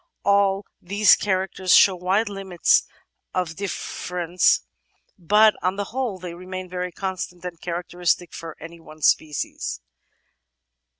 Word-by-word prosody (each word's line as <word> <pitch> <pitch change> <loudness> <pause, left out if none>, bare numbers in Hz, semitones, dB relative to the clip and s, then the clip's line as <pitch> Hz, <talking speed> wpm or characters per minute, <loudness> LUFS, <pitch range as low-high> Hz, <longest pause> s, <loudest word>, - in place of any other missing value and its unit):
All 200 0 +2 0.2
these 200 +2 +5
characters 190 -1 +1
show 195 - +6
wide 190 +5 +1
limits 195 -3 +1 0.5
of 180 -2 0
diflFerence, 180 -1 0 0.6
but 210 +5 +5
on 185 +1 0
the 205 - -2
whole 250 -7 -2
they 180 -1 -7
remain 185 +1 -7
very 180 0 -4
constant 180 -1 -5
and 175 -2 -7
characteristic 175 0 -2
for 165 -2 -8
any 165 +1 -10
one 155 -1 -14
species. 150 - 0
185 Hz, 120 wpm, -23 LUFS, 175-195 Hz, 0.6 s, show